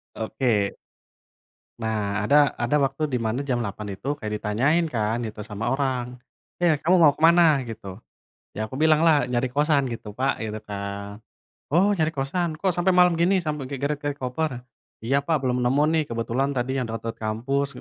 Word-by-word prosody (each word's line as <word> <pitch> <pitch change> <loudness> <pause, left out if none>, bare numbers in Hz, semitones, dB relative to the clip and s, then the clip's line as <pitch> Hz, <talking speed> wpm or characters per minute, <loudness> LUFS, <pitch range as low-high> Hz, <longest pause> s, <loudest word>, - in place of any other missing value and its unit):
Oke. 110 -3 0 1.0
Nah 105 -2 -2
ada 145 +2 +4
ada 120 +5 +1
waktu 135 +3 0
dimana 125 0 -2
jam 120 -3 0
8.00 100 -1 -5
itu 140 +9 -3
kayak 105 0 -5
ditanyain 140 +11 +1
kan 115 +1 -1
itu 110 -1 -6
sama 110 +3 -3
orang, 130 -2 -2 0.4
"Eh, 175 -3 +3
kamu 180 +4 +3
mau 150 -4 +6
ke 155 - -11
mana?" 165 -4 +5
gitu. 110 -4 -8 0.6
Ya 110 +1 -2
aku 130 +6 -7
bilanglah, 155 -1 +4
"Nyari 125 +1 0
kosan 145 0 +2
gitu, 105 -2 -7
Pak," 135 +2 0
gitu 110 -1 -4
kan. 100 0 -6 0.5
"Oh, 195 +5 +4
nyari 160 -2 +1
kosan 155 +5 -1
kok 190 -3 0
sampai 180 +2 +2
malam 180 -1 +5
gini 185 +3 +3
sampai 150 -4 -3
kayak 135 0 -6 0.2
geret-geret 145 -1 -4
koper?" 130 0 -2 0.4
"Iya, 135 +5 +1
Pak, 160 -1 +1
belum 125 0 0
nemu 135 +4 +3
nih 160 -1 +2
kebetulan 120 +4 -1
tadi 130 +1 -1
yang 125 - -1
deket-deket 115 +1 -5
kampus 125 +6 -1
130 Hz, 170 wpm, -24 LUFS, 110-150 Hz, 1.0 s, mau